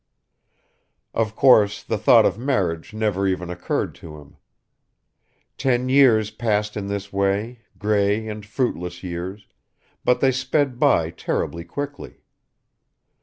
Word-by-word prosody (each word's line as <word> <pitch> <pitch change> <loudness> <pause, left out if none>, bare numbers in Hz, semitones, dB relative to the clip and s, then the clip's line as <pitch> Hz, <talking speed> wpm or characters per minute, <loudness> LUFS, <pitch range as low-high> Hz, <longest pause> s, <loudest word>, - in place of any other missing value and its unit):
Of 110 -1 -1
course 105 -7 +4
the 110 - -2
thought 110 +1 +6
of 100 +2 0
marriage 95 -11 -1
never 105 -3 -1
even 90 -2 -2
occurred 90 0 -2
to 75 -2 -10
him. 75 -1 -16 1.2
Ten 125 -1 +1
years 120 -6 +4
passed 105 -2 -1
in 100 -2 -4
this 100 0 -5
way, 100 +5 -1 0.2
grey 105 +1 +1
and 105 -1 -6
fruitless 90 -6 -3
years, 90 +3 -6 0.6
but 125 0 +2
they 135 0 +3
sped 130 0 -1
by 105 - +3
terribly 85 0 -3
quickly. 145 +10 -7
105 Hz, 120 wpm, -22 LUFS, 95-120 Hz, 1.2 s, thought